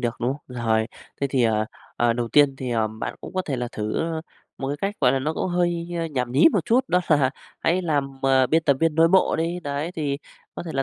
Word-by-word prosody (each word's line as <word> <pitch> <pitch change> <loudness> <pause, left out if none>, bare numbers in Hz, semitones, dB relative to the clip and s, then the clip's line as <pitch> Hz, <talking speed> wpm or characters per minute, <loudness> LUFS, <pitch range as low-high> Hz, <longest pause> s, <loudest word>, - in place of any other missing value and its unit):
được, 120 -1 -1
đúng 120 +2 +1
không? 145 - -10 0.2
Rồi, 110 -1 +2 0.3
thế 140 - +2
thì, 130 -2 +2
ờ, 110 -1 +2 0.3
ờ, 120 -1 +3
đầu 120 0 -2
tiên 145 +1 +4
thì, 130 -1 -4
ờ, 115 -2 +1
bạn 110 +1 -5
cũng - - -9
có 185 - 0
thể 140 -7 -3
là 125 -1 -3
thử 105 +5 -2 0.6
một 135 - -3
cái 145 - -2
cách, 200 +1 -1
gọi 125 -3 +4
là, 135 - +1
nó 150 +4 -1
cũng - - -1
hơi, 175 -1 0
ơ, 165 - -1
nhảm 125 -6 -3
nhí 140 +5 +6
một - - +1
chút 240 +2 +4
đó 180 - +3
là 145 -4 +4 0.3
hãy 180 +3 +1
làm, 145 -5 0
à, 135 -1 +4
biên 160 +5 +2
tập 140 -4 +3
viên 165 -1 +2
nội 165 +1 +5
bộ 190 +2 +3
đi. 170 +2 -1
Đấy, 145 +1 -3
thì 145 -3 -1 0.4
có - - -5
thể 170 - -7
là 135 - +1
140 Hz, 260 wpm, -24 LUFS, 125-165 Hz, 0.6 s, nhí